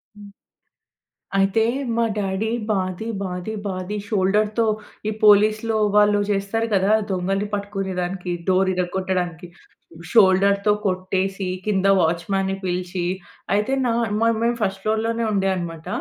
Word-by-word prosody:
హ్మ్. 205 -1 -12 1.0
అయితే, 195 +3 +3 0.3
మా 235 - +2
డాడీ 200 +2 -1 0.2
బాది, 190 +1 -1 0.2
బాది, 180 +3 -4
బాది 185 +2 -4
షోల్డర్‌తో, 210 +3 +1 0.4
ఈ - - -1
పోలీస్‌‌లో 215 +2 +4 0.2
వాళ్ళు 205 0 +5
చేస్తారు 205 +3 0
కదా! 195 +2 +3 0.2
దొంగలని 195 +2 -1
పట్టుకునే 200 -2 -3
దానికి 180 0 -4 0.2
డోర్ 190 0 +3
విరగొట్టడానికి. 180 -1 -2 0.6
షోల్డర్‌తో 200 -1 +4
కొట్టేసి, 190 +1 -1 0.2
కింద 195 -2 0 0.2
వాచ్‌మెన్‌న్ని 190 +4 0
పిలిచి. 180 0 -2 0.5
అయితే, 210 +6 0
న - - +2 0.3
మ - - -4 0.2
మేము 235 0 +1
ఫస్ట్ 195 -1 -1
ఫ్లోర్‌ 220 +1 0
లోనే 230 0 -1
ఉండే 195 -1 +1
అన్నమాట. 165 -2 -6
195 Hz, 120 wpm, -22 LUFS, 185-210 Hz, 1.0 s, వాళ్ళు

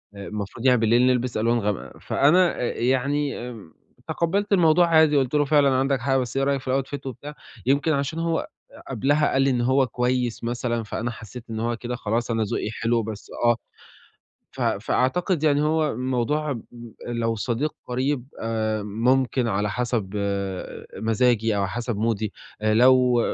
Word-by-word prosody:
آآ، 100 -1 -8
المفروض 105 +3 -6
يعني 125 -2 +5
بالليل 115 +2 +3
نلبس 125 -2 +1
ألوان 115 +2 +2
غامقة، 105 -2 -4
فأنا 170 +6 +3
إ - - 0
يعني 135 +1 0
امم 105 -10 -11 0.3
تقبّلت 200 +5 0
الموضوع 175 -1 +5
عادي 160 -3 +5
قُلت 130 -1 0
له: 145 -1 +3
"فعلًا 145 -1 +4
عَندك 135 +1 +1
حق 135 +1 +1
بس 125 0 -2
إيه 135 - +2
رأيك 140 -1 +1
في 135 +1 0
الoutfit؟" 140 +1 -8
وبتاع 140 +3 -7 0.3
يمكن 140 +5 +2
عشان 140 +3 -2
هو 165 0 0
أ - - -6 0.4
قَبلها 145 +5 +1
قال 135 - +3
لي 135 - +3
إن 125 -2 +1
هو 130 +2 +3
كويّس 125 0 -1
مثلًا، 120 0 -2
فأنا 115 +3 -3
حسّيت 115 +1 -10
إن 110 -1 -4
هو 120 +1 -1
كده 125 +1 -4
خلاص، 115 +1 -2
أنا 115 -1 +1
ذوقي 105 - -2
حلو 115 0 0
بس 105 -1 -8
آه، 120 0 +5 1.0
ف - - -10
فأعتقد 170 +5 0
يعني 145 -1 +3
هو 155 0 +1
الموضوع 130 +5 -1
م 115 -4 -6 0.5
لو 115 -1 -1
صديق 120 +7 -2
قريب 130 +1 -1 0.2
آآ، 110 -1 -1
ممكن 120 +4 +1
على 105 0 0
حسب 120 -3 -2 0.9
مزاجي 115 -1 +1
أو 100 -1 +1
حسب 120 +3 -3
مودي، 110 -1 -1 0.3
لو 125 +3 +5
125 Hz, 165 wpm, -24 LUFS, 115-140 Hz, 1.0 s, يعني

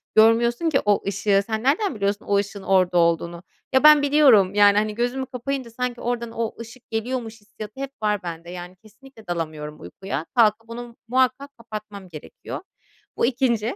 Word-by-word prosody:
görmüyorsun 235 +7 +4
ki 275 - +2
o 205 -1 +2
ışığı. 200 0 +1
Sen 220 +1 -3
nereden 290 - +1
biliyorsun 200 0 -2
o 200 0 +2
ışığın 200 -1 -3
orada 185 -2 +2
olduğunu?" 170 +1 +1 0.3
Ya 265 - +4
ben 300 -1 +8
biliyorum. 270 -10 +5
Yani, 205 0 +5
hani, 210 0 0
gözümü 245 +3 -1
kapayınca 255 0 -4
sanki 245 0 -4
oradan 235 -1 -3
o 230 -1 -3
ışık 230 +2 -11
geliyormuş 225 -1 -4
hissiyatı 215 +2 -10
hep 275 0 -4
var 210 -2 0
bende. 170 0 -7
Yani, 180 +1 -8
kesinlikle 220 +3 -18
dalamıyorum 155 -3 -4
uykuya. 155 - -5
Kalkıp 225 0 +3
onu 235 0 -8
muhakkak 260 +3 0
kapatmam 210 -4 -9
gerekiyor. 165 - -9 0.6
Bu - - +2
2'nci. 240 -2 0
220 Hz, 165 wpm, -23 LUFS, 200-250 Hz, 0.6 s, ben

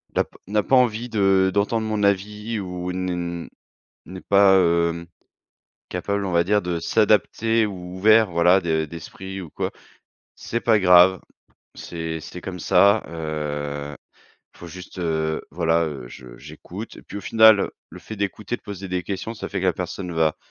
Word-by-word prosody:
n'a - - +3
p - - -24
n'a 105 +1 +1
pas 135 - +2
envie 120 -1 +2
de 95 -3 +3
d'entendre 110 +2 0
mon 110 -1 -2
avis 105 +3 -1
ou 90 -2 -5
ne 90 -2 -3 0.6
n'est 90 +2 -9
pas 100 -1 +5
hem, 85 -1 +1 0.8
capable 100 +3 -2
on 95 - -3
va 85 0 +4
dire 105 +3 +2
de 90 -1 -3
s'adapter 110 +3 +2
ou 90 -2 -8
ouvert 110 +2 +5
voilà 90 +3 +4
de 80 -2 0
d'esprit 95 +4 -8
ou 85 - -10
quoi. - - -3 0.7
C'est 120 - -4
pas 110 -2 +3
grave, 90 0 +6 0.6
c'est 80 -1 -5
c'est 90 +3 -9
comme 90 0 -7
ça, 100 +5 +4
heu, 75 -3 -4 0.6
faut 85 - -11
juste, 90 +2 -11
heu, 80 -2 -1
voilà, 85 -1 +1
heu, 70 -5 -6
je - - -12
j'écoute 105 +6 -10
et - - -13
puis - - -10
au - - -4
final, 110 0 +6
heu, - - -2 0.2
le - - -12
fait 110 +5 -9
d'écouter, 100 +2 -3
de - - -25
poser 100 -1 -8
des 90 0 -2
questions, 100 +4 -5
ça 110 - -6
fait 95 - -3
que - - -3
la 90 - +3
personne 90 +1 -5
va 80 -2 +1
90 Hz, 175 wpm, -23 LUFS, 85-100 Hz, 0.8 s, grave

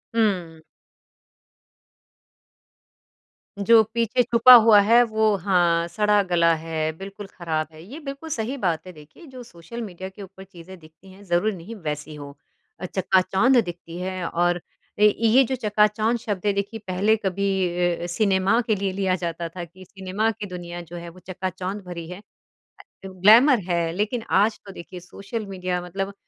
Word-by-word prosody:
हुँ। 180 -8 0 3.0
जो 225 +3 +6
पीछे 235 +1 +1
छुपा 235 +1 +7
हुआ 225 -3 +7
है 230 +4 +5
वो 220 -2 +1
हाँ, 175 -3 +1
सड़ा-गला 185 -4 +2
है 160 -1 -3
बिल्कुल 195 +2 -9
ख़राब 160 -4 -3
है। 155 - -13
ये 255 - -10
बिल्कुल 280 +1 -8
सही 245 0 -3
बात 170 -8 -1
है - - -8
देखिए 155 - -16
जो 260 -2 -11
सोशल 200 +2 -10
मीडिया 190 -3 -7
के 190 +2 -14
ऊपर 190 0 -13
चीज़ें 190 -1 -13
दिखती 160 +4 -18
हैं 195 +2 -16
ज़रूरी 190 +3 0
नहीं 185 +6 -10
वैसी 150 -4 -6
हो। 145 -1 -9 0.5
अ, 180 - -5
चकाचौंध 190 +7 +2
दिखती 170 -1 -8
है 185 -1 -4
और 175 0 0 0.4
ए, 210 - +6
ये 230 +4 +5
जो 260 +1 -2
चकाचौंध 215 0 +1
शब्द 205 -4 -5
है 205 - +2
देखिए 200 +3 -4
पहले 195 +4 +2
कभी 195 +1 -1 0.5
अ - - -4
अ, - - -3
सिनेमा 195 +3 +1
के 220 - +2
लिए 195 -1 -2
लिया 190 -1 0
जाता 170 0 -4
था 175 +1 -7
कि 185 +3 -16
सिनेमा 195 +3 -2
की 220 -1 -7
दुनिया 175 -1 -7
जो 170 0 -11
है 170 0 -8
वो 175 +2 -15
चकाचौंध 185 +2 -5
भरी 170 -2 -7
है। 180 +1 -8
अ, 205 - -26 0.6
ग्लैमर 220 +8 +5
है। 170 -1 0
लेकिन 215 +5 -2 0.2
आज 215 0 -1
तो 200 - -9
देखिए 180 +1 -10
सोशल 200 +5 -7
मीडिया 180 -2 -3
मतलब 195 +3 -5
190 Hz, 165 wpm, -23 LUFS, 175-215 Hz, 3.0 s, छुपा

